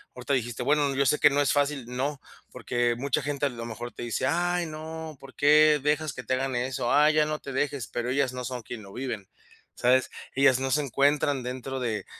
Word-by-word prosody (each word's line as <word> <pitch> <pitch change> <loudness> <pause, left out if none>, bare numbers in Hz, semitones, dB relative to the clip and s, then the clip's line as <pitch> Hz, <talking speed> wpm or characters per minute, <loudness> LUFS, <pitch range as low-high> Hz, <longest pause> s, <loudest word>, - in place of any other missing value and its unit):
ahorita 125 +2 -3
dijiste: 120 -1 -1
"Bueno, 145 0 +2
yo 140 0 +2
sé 150 - +2
que 145 - +7
no 145 0 +1
es 145 - +2
fácil". 145 -3 0
No, 135 +3 -3 0.3
porque 120 -1 0
mucha 140 +2 0
gente, 145 0 -1
a - - -3
lo 115 -2 -7
mejor, 120 +1 -6
te - - -8
dice: 120 +2 -2
"Ay, 175 +2 +1
no, 160 0 -7
¿por 135 -1 -13
qué 150 0 +5
dejas 150 0 0
que 125 - -7
te 130 - 0
hagan 130 -1 -2
eso? 125 0 -1
Ay, 150 +1 +5
ya 155 -1 +4
no 155 0 -3
te 140 - -8
dejes", 135 -3 -2
pero 120 +1 -3
ellas 135 -1 +1
no 125 -1 -5
son 125 -1 -4
quien 110 -2 -8
lo 100 - -13
viven, 120 -7 -5 0.5
¿sabes?, 130 +1 +3 0.3
ellas 135 -2 +4
no 135 0 -1
se 150 - +3
encuentran 140 0 +1
dentro 130 +1 -5
de 110 -3 -2
135 Hz, 225 wpm, -27 LUFS, 125-145 Hz, 0.5 s, que